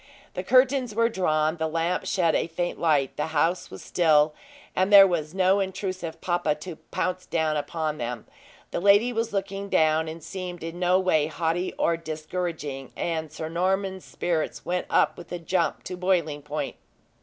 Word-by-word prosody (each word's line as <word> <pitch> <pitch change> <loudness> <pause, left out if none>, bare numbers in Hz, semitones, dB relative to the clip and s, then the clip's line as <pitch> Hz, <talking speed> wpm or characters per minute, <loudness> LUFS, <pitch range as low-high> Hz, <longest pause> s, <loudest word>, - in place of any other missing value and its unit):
The - - -3
curtains 255 -3 +3
were 230 +1 +3
drawn; 155 -5 +1
the 160 0 -1
lamp 165 +3 -1
shed 170 -4 +2
a - - +1
faint 175 +1 -3
light; 145 -5 +2
the 150 - -1
house 170 +4 +1
was - - -10
still, 155 -3 +3 0.4
and 185 +2 +1
there 200 -1 +10
was 170 -3 -2
no 190 +1 +4
intrusive 185 -3 -4
papa 175 -4 0
to 160 +2 -8
pounce 185 0 -2
down 160 -2 0
upon 155 +1 -2
them; 120 0 -4 0.5
the - - -1
lady 205 +6 +5
was 230 0 -1
looking 195 0 -3
down, 160 -1 +3
and 160 0 -7
seemed 180 -1 -6
in 165 +1 -6
no 180 +1 +3
way 160 -5 +2
haughty 165 +3 -1
or 170 - +1
discouraging, 155 -4 -5
and 160 -2 -2
Sir 155 0 -5
Norman's 190 +3 -1
spirits 165 -3 -2
went 180 0 -1
up - - +2
with 175 - -12
a 175 - -2
jump 170 +1 -1
to 180 - -5
boiling 175 -5 0
point. 150 +1 -4
170 Hz, 175 wpm, -26 LUFS, 155-185 Hz, 0.5 s, there